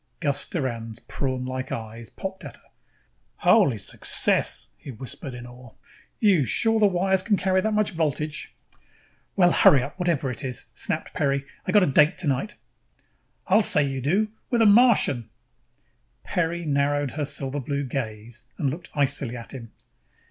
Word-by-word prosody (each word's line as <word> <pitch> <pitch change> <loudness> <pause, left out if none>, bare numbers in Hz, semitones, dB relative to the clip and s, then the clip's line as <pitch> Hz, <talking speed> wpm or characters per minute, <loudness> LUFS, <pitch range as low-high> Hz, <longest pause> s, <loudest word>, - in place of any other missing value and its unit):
Gus 145 -3 -1
Doran's 115 -7 -4
prawnlike 130 -1 -4
eyes 115 +1 -7
popped 190 0 -7
at - - -9
her. - - -29 0.7
"Holy 180 - +3
Success," 100 - +1
he - - -13
whispered 130 +2 -7
in 120 0 -9
awe. 125 -1 -14 0.4
"You 195 -9 +4
sure 225 - +3
the 210 - +5
wires 190 0 +1
can 205 +1 +1
carry 185 0 +1
that 220 +2 -1
much 215 -1 +1
voltage?" 155 -2 -3 0.8
"Well, 175 -3 +4
hurry 135 -6 +5
up 145 - -9
with 180 - -2
whatever 140 -6 0
it 125 +4 -4
is," 125 -2 -3
snapped - - -3
Peri. 140 -1 0 0.2
"I - - +1
got 210 -2 +5
a - - +4
date 150 +3 +3
tonight." 145 +4 -2 0.9
"I'll 205 +4 +4
say 150 - +5
you 135 -1 -3
do! 190 - +1 0.2
With 235 -2 +2
a - - +4
Martian!" 205 - +4 0.9
Peri 170 0 -2
narrowed 145 -1 0
her 150 +3 -3
silver 140 0 -2
blue 140 +2 -3
gaze 115 -3 -5 0.2
and 140 -7 0
looked 175 +5 -8
icily 135 -3 0
at 115 - -9
him. 115 -4 -9
145 Hz, 160 wpm, -24 LUFS, 130-185 Hz, 0.9 s, the